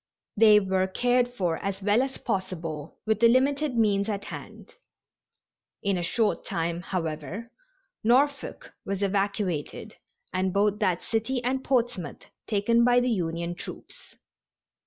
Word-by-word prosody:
They 215 -1 +7
were 190 -1 0
cared 245 +5 +2
for 180 -9 -1
as 195 0 -4
well 210 +4 +4
as 270 0 -3
possible 165 -6 -4
with 220 -1 +1
the 235 - +7
limited 275 +2 +2
means 205 -2 +2
at 200 -1 -3
hand. - - -9 1.1
In 200 -2 +1
a 175 - -1
short 210 +5 0
time, 170 +1 -2
however, 175 - -4 0.5
Norfolk 275 +5 +1
was 195 0 -3
evacuated, 195 -5 -2 0.4
and 185 0 0
both 205 +1 +2
that 185 -5 +1
city 240 +3 -1
and 260 +2 -1
Portsmouth 240 - -1 0.2
taken 230 +3 +3
by 245 0 +5
the 245 0 +1
Union 170 -3 -2
troops. - - -11
205 Hz, 135 wpm, -27 LUFS, 185-240 Hz, 1.1 s, They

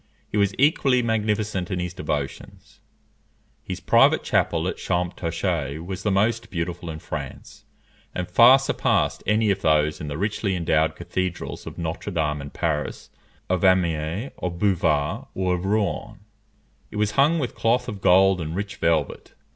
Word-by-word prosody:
He - - -4
was 100 -1 +2
equally 135 -3 +3
magnificent 105 -4 -1
in 95 - -2
his 90 0 -3
devotions. 75 -6 -5 0.8
His - - -5
private - - +4
chapel 80 +1 +1
at - - -3
Champtocé 85 -4 -2
was 95 0 -5
the 105 - 0
most 110 +4 +1
beautiful 85 -1 -4
in 80 - -5
France, - - -8 0.5
and 90 -1 -3
far 120 +3 +7
surpassed 135 - 0
any 105 0 +3
of 95 0 -2
those 75 -2 +2
in 75 - -5
the 75 0 -4
richly 100 0 -1
endowed 80 -2 +1
cathedrals 90 -1 -4
of - - -8
Notre 85 +3 -4
Dame 75 -4 -1
in 70 - -7
Paris, 75 -1 -3 0.4
of 90 0 0
Amiens, 90 - +1
of 90 -1 -3
Beauvais, 85 -7 +1
or 90 -1 0
of 90 +1 -3
Rouen. 100 -1 -1 0.7
It - - -11
was 105 0 +1
hung 145 +7 +3
with 130 -6 -2
cloth 120 +2 +1
of 105 -5 -6
gold 95 0 +5
and 80 +1 -4
rich 100 +1 -4
velvet. 80 -4 -1
90 Hz, 155 wpm, -24 LUFS, 80-105 Hz, 0.8 s, far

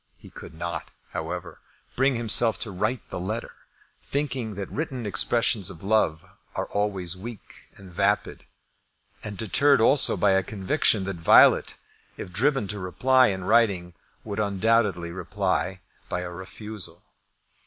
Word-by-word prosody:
He - - -15
could 80 - -11
not, 85 0 -5 0.2
however, - - -5 0.4
bring 135 +1 +2
himself 115 0 +2
to 110 - -2
write 105 +6 -3
the - - -4
letter, 110 +6 -4 0.5
thinking 135 -7 -3
that 100 0 -6
written 130 -6 -4
expressions 105 +1 +1
of 90 -3 -11
love 95 -7 +1 0.3
are - - -2
always 95 -4 -1
weak 110 +3 -11
and 95 -3 -13
vapid, - - 0 0.8
and 105 -2 -6
deterred 125 +8 +3
also 135 +5 +5
by 100 - +3
a 95 0 +3
conviction 100 - +1
that 95 -1 -4
Violet, 80 - +5 0.4
if 90 - -8
driven 135 +2 +1
to 105 - -3
reply 130 +8 +3
in 95 -2 -2
writing, 100 -5 +2 0.3
would 105 -1 -5
undoubtedly 100 -4 +1
reply 95 0 -2 0.3
by 90 - -2
a 90 -1 -6
refusal. 95 +3 -7
100 Hz, 140 wpm, -25 LUFS, 90-115 Hz, 0.8 s, also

